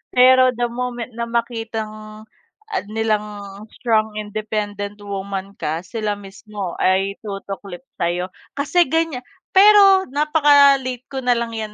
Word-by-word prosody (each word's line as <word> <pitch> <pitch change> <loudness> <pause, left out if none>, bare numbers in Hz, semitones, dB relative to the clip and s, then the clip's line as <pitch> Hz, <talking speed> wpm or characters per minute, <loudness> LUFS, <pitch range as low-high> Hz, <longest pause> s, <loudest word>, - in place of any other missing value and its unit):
Pero 255 0 +6
the 240 0 -1
moment 245 -1 -4
na 235 0 -4
makitang, 220 -2 -4 0.5
ah, 390 - -1
nilang 215 0 0 0.5
strong 220 -2 0
independent 210 -1 -4
woman 195 0 -5
ka, 160 +3 -2
sila 215 0 -3
mismo 200 -1 -7
ay 195 +1 +1
tutuklip 195 -2 -7 0.2
sa'yo. 175 +2 -1 0.2
Kasi 325 +5 +2
ganiya 325 -2 0 0.4
pero 390 -1 +7
napaka-late 280 -4 +3
ko 265 -1 -5
nalang 235 -2 0
'yan, 215 -1 -5
225 Hz, 120 wpm, -20 LUFS, 205-255 Hz, 0.5 s, pero